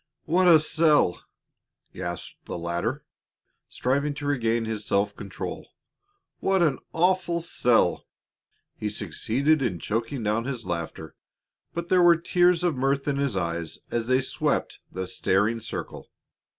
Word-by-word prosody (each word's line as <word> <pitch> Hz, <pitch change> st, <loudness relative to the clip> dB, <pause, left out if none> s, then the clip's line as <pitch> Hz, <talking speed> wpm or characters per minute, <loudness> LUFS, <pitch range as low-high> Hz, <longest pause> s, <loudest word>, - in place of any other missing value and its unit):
"What 180 Hz, +3 st, +3 dB
a 165 Hz, -3 st, +8 dB
sell!" 155 Hz, -, +3 dB, 0.7 s
gasped 85 Hz, -2 st, -7 dB
the -, -, -5 dB
latter, 85 Hz, +1 st, -3 dB, 0.6 s
striving 140 Hz, +3 st, -1 dB
to 145 Hz, -, -6 dB
regain 120 Hz, -5 st, +1 dB
his 110 Hz, -1 st, -3 dB
self 100 Hz, 0 st, 0 dB
control; 100 Hz, -2 st, -7 dB, 0.7 s
"what 190 Hz, -2 st, +2 dB
an 150 Hz, -5 st, +1 dB
awful 180 Hz, 0 st, +1 dB
sell!" 120 Hz, -, +2 dB, 0.7 s
He 105 Hz, -, -3 dB
succeeded 115 Hz, -, 0 dB
in 105 Hz, -9 st, -1 dB
choking 115 Hz, -, -3 dB
down 110 Hz, +2 st, 0 dB
his 130 Hz, -4 st, -4 dB
laughter, 80 Hz, -2 st, -5 dB, 0.6 s
but 170 Hz, 0 st, -4 dB
there 185 Hz, -1 st, +5 dB
were 175 Hz, -1 st, +6 dB
tears 175 Hz, +1 st, +3 dB
of 175 Hz, -4 st, +1 dB
mirth 135 Hz, +2 st, 0 dB
in 140 Hz, -1 st, 0 dB
his 140 Hz, -7 st, 0 dB
eyes 85 Hz, -2 st, -2 dB
as 115 Hz, -1 st, -1 dB
they 130 Hz, +1 st, +3 dB
swept -, -, -1 dB
the 95 Hz, 0 st, -4 dB
staring 100 Hz, +5 st, +1 dB
circle. 115 Hz, 0 st, -6 dB
125 Hz, 135 wpm, -26 LUFS, 100-155 Hz, 0.7 s, a